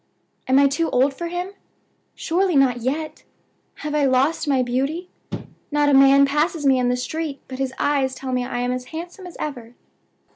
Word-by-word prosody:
"Am 260 - +4
I 280 0 +6
too 320 +4 0
old 265 +3 +2
for 340 +5 -5
him? 355 +2 -4 0.6
Surely 360 +1 0
not 265 -3 +4
yet! 300 +6 -3 0.6
Have 300 - -2
I 295 -1 +2
lost 275 +5 +2
my 265 -3 +2
beauty? 275 +9 -2 0.6
Not 295 -1 +2
a - - +3
man 275 +1 +7
passes 300 +2 0
me 265 -2 +4
in 245 -1 +1
the 250 - +1
street 305 +2 -4
but 260 0 -8
his 270 -1 -1
eyes 275 -2 +1
tell 260 0 -5
me 250 -1 0
I 245 -1 -3
am 245 0 0
as 250 0 -3
handsome 345 +6 -8
as 350 - -11
ever. 245 -5 -6
275 Hz, 190 wpm, -22 LUFS, 255-315 Hz, 0.6 s, man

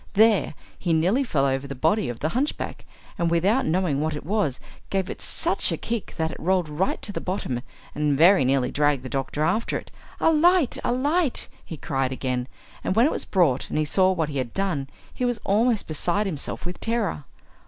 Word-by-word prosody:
There 215 -6 +4 0.2
he 175 -3 0
nearly 185 - +2
fell 145 - +1
over 135 0 -1
the 140 - -6
body 160 - +1
of 120 - -6
the 155 - +1
hunchback, 265 - -3 0.3
and 170 -1 +2
without 195 +10 +2
knowing 160 -4 +1
what 155 0 -1
it 150 - -7
was 190 -9 0 0.3
gave 195 -1 -1
it - - -8
such - - +1
a - - -1
kick 230 -3 -4
that 160 0 0
it - - -9
rolled 180 -2 +1
right 160 +6 -1
to 205 - -3
the - - -4
bottom, 155 -10 -3 0.3
and 150 -2 +1
very 175 +2 +6
nearly 130 0 +1
dragged 145 -2 +1
the 130 - -6
doctor 135 +2 -2
after 215 +9 0
it. - - -10 0.3
"A 325 - +4
light! 330 -2 +3
a - - +1
light!" 285 +4 +1 0.2
he 160 - -8
cried 135 -2 -1
again, 125 -1 -2 0.4
and 185 - -1
when 230 +3 +5
it 300 - +2
was - - -3
brought 160 -10 +2
and - - -2
he 155 - +2
saw 185 +4 +3
what 165 -5 -1
he 140 -2 -2
had 125 -2 -4
done 180 -9 -1 0.3
he - - -4
was 245 -2 0
almost 220 +2 +2
beside 175 +6 0
himself 165 -4 -3
with 180 +1 -5
terror. 225 -10 -1
170 Hz, 210 wpm, -24 LUFS, 145-215 Hz, 0.4 s, very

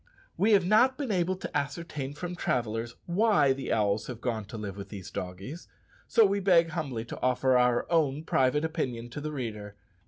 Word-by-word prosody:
We 215 +2 +3
have 195 -3 +5
not 240 +7 +4
been 275 -6 -2
able 185 -1 +1
to 180 - -7
ascertain 145 -1 -3
from 175 +2 -5
travellers 115 -6 -2
why 175 -7 +3
the 135 0 -5
owls 105 -1 +1
have 125 -3 -6
gone 115 -4 -2
to 110 - -8
live 105 -3 -5
with 100 -1 -8
these 100 -4 -8
doggies, 95 - -6 0.4
so 225 - +5
we 200 0 +1
beg 175 -4 +4
humbly 140 -9 -3
to - - -8
offer 130 +1 +2
our 125 -1 +3
own 155 -3 +2
private 150 +1 +2
opinion 125 -7 -3
to 145 - -6
the 155 +1 -4
reader. 110 -7 -5
135 Hz, 190 wpm, -29 LUFS, 115-170 Hz, 0.4 s, have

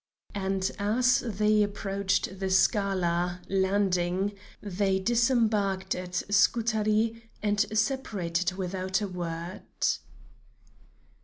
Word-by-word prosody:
And 190 -1 -1
as 245 +5 +3
they 215 -2 +2
approached 200 -2 -1
the 190 -1 -1
Scala 185 -3 +1
(landing), 190 0 +1 0.3
they 195 -1 0
disembarked 220 -3 +1
at 180 -1 -3
Scutari 220 +2 +2
and 205 -1 +1 0.2
separated 195 -8 0
without 190 +1 -2
a 205 - -1
word. 175 -1 -5
195 Hz, 85 wpm, -28 LUFS, 185-215 Hz, 0.3 s, as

